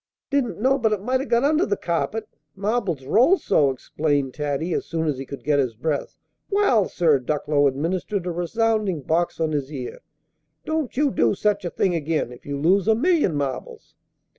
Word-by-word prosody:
"Didn't 275 -6 0
know 265 +4 +2
but 220 -3 +2
it 200 -2 -3
might 255 +3 +1
'a' 275 - -5
got 235 +1 +2
under 310 +4 +3
the 410 - 0
carpet, 210 +6 -2 0.3
marbles 200 - -1
roll 250 - +4
so," 145 - +2
explained 140 +1 -1
Taddy, 150 +3 -2
as - - -1
soon 165 -1 -2
as 145 -4 -1
he 135 - -6
could 140 - -8
get 145 -1 +2
his 125 -5 0
breath. 145 +5 -3 0.3
"Wal, 390 - +3
sir," 155 -5 +3
Ducklow 145 +2 +1
administered 175 +7 -2
a 180 - -1
resounding 195 -1 0
box 165 +5 0
on 160 -1 0
his 145 -1 -2
ear, 130 -4 -6 0.6
"don't 315 -6 -2
you 290 -1 +3
do - - +2
such 205 -1 0
a - - -1
thing 185 +1 0
again, 155 -5 -1
if 125 - -13
you 140 0 -3
lose 185 +6 +3
a 220 - +5
million 295 - +2
marbles!" 140 -3 -4
175 Hz, 190 wpm, -23 LUFS, 145-225 Hz, 0.6 s, a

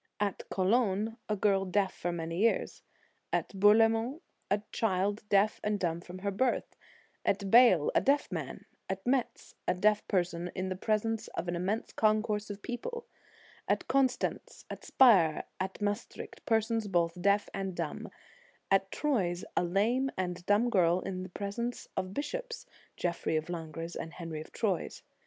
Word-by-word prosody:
At 205 -2 -1
Cologne, 210 +2 +1
a 210 - +1
girl 195 -1 +2
deaf 195 +1 0
for 175 - -3
many 165 0 -4
years; 225 +2 +1 0.5
at - - 0
Bourlemont, 225 - +4 0.3
a 205 +1 +1
child 205 0 0
deaf 200 +2 +3
and 210 -1 0
dumb 170 -2 -1
from 180 +1 -9
her 200 - +1
birth; 245 +6 0 0.5
at 195 -1 0
Bale, 230 -11 +6
a - - +4
deaf 285 +1 +2
man; - - -5 0.2
at 190 0 -4
Metz, 255 -1 -1
a - - +2
deaf 210 +3 +2
person 175 -2 0
in 185 0 -2
presence 220 +1 0
of - - -2
an 175 - -1
immense 195 +6 -2
concourse 215 -1 +1
of 205 0 -7
people; 470 - -5 0.6
at - - 0
Constance, 265 -2 0
at - - -7
Spire, 190 -12 +5 0.2
at 190 0 -3
Maes 205 +2 -1
tricht, - - -10
persons 225 -1 +1
both 175 -2 0
deaf 200 +2 +3
and 195 -2 -3
dumb; - - -4 0.6
at 195 0 +3
Troyes, 190 -12 0
a - - +2
lame 220 +9 +1
and 180 -1 -3
dumb 215 +4 +3
girl 180 -3 +3
in 185 -1 -5
presence 205 +6 -4
of 190 - 0
the 185 - -10
bishops, 475 - -4 0.3
Geoffrey 170 -2 -1
of 155 +2 -1
Langres 165 0 -5
and 165 - -6
Henry 165 -3 -6
of - - -12
Troyes. 195 -7 -2
200 Hz, 160 wpm, -31 LUFS, 180-225 Hz, 0.6 s, Bale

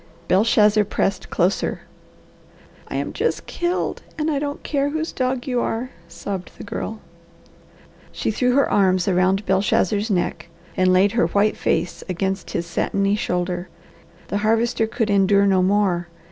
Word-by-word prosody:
Belshazzar 210 +1 +4
pressed 195 -1 -1
closer. 185 +2 0 1.1
"I - - -6
am - - -2
just - - -1
killed, 350 +1 -2 0.2
and 310 0 0
I 285 - 0
don't 285 0 -4
care 285 -1 0
whose 315 +2 -3
dog 255 -1 -1
you 250 -2 0
are," 245 +3 -2 0.2
sobbed 190 -1 -6
the - - -8
girl. 215 +1 -5 1.1
She - - -2
threw 250 +3 +1
her 280 - +4
arms 185 -2 +2
around 190 +2 +2
Belshazzar's 200 +2 +1
neck 175 -3 -1 0.3
and 185 0 +3
laid 190 +2 +4
her 235 +2 +2
white 205 +1 +2
face 175 - -1
against 190 +1 -2
his 170 - -2
satiny 195 +4 0
shoulder. 180 -2 -2 0.6
The 205 - -1
Harvester 225 +1 +1
could 225 -2 -1
endure 200 0 +4
no 190 -2 +3
more. 185 -2 +1
205 Hz, 145 wpm, -22 LUFS, 185-235 Hz, 1.1 s, Belshazzar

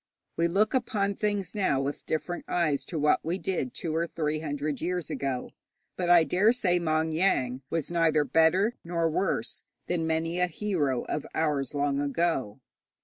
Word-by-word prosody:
We 170 - +2
look 200 +5 +2
upon 215 -6 0
things 205 -1 -2
now 190 -10 +1
with 140 +1 -4
different 175 +3 -3
eyes 155 -5 0
to 170 - -4
what 150 0 +3
we 170 +3 -1
did 175 -10 -2
two 160 -2 -3
or 165 +1 0
three 155 -2 -2
hundred 145 -2 -3
years 175 -1 -2
ago, 135 -2 -3 0.4
but 180 -1 -2
I 175 -2 +7
dare 185 +9 +3
say 180 -8 +1
Maung 160 -1 0
Yaing 130 -8 +1
was 165 0 -2
neither 165 -3 +3
better 165 - +3
nor 170 -1 0
worse 165 +4 -1 0.2
than 165 -2 -1
many 165 +2 -1
a 180 - +3
hero 155 - -1
of 150 - -4
ours 150 -3 0
long 140 0 +1
ago. 140 -6 -1
165 Hz, 170 wpm, -28 LUFS, 145-180 Hz, 0.4 s, I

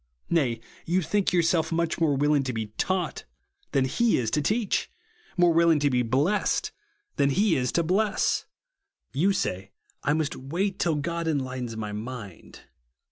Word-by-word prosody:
Nay, 130 -9 +1 0.3
you 180 +2 +2
think 205 +4 +1
yourself 170 -2 +2
much 165 0 0
more 150 -4 +3
willing 145 +1 +3
to 130 - -2
be 110 -2 -4
taught 185 -1 -1 0.5
than 135 -2 +2
he 230 - +2
is 115 -3 -1
to 150 - +1
teach; 215 +7 0 0.5
more 175 -1 +5
willing 165 -1 +5
to 145 -1 +1
be 125 -1 +2
blest 140 - +1 0.5
than 140 - +3
he 195 +5 +2
is 125 -2 0
to 170 - +2
bless. 200 +5 +1 0.7
You 170 +9 +3
say, 95 - -2 0.3
I 145 - +2
must 155 -1 0
^vait 180 +9 -3
till 170 -3 +1
God 170 +3 -2
enlightens 130 -6 -2
my 105 -1 -4
mind. 105 -3 -8
150 Hz, 160 wpm, -26 LUFS, 130-175 Hz, 0.7 s, more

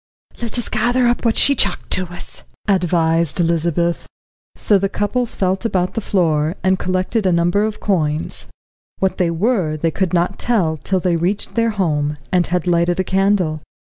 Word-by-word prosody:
"Let 235 0 -3
us 240 - -2
gather 245 +3 +1
up 240 0 +1
what 230 -2 +1
she 280 - +5
chucked 200 -8 -1
to 185 -1 -1
us," 175 - -11 0.3
advised 170 -4 +1
Elizabeth. 170 0 0 0.5
So 205 -2 +2
the 195 +1 0
couple 235 +5 -1
felt 190 -1 -1
about 185 -5 0
the 225 - -2
floor, 165 -5 +1
and 190 0 +2
collected 185 +3 0
a - - +3
number 175 +4 +2
of 215 -1 -4
coins. 155 -6 -1 0.5
What 190 -1 -1
they 180 -2 +2
were 170 -3 0
they 165 +1 0
could 185 0 -1
not 180 +2 0
tell 185 -10 +1
till 185 +6 -1
they 175 -2 +1
reached 180 +5 -2
their 230 -1 +1
home, 150 -8 -1
and 180 -1 +2
had 180 -1 -1
lighted 175 0 +1
a - - +2
candle. 190 -5 +1
185 Hz, 175 wpm, -19 LUFS, 170-205 Hz, 0.5 s, she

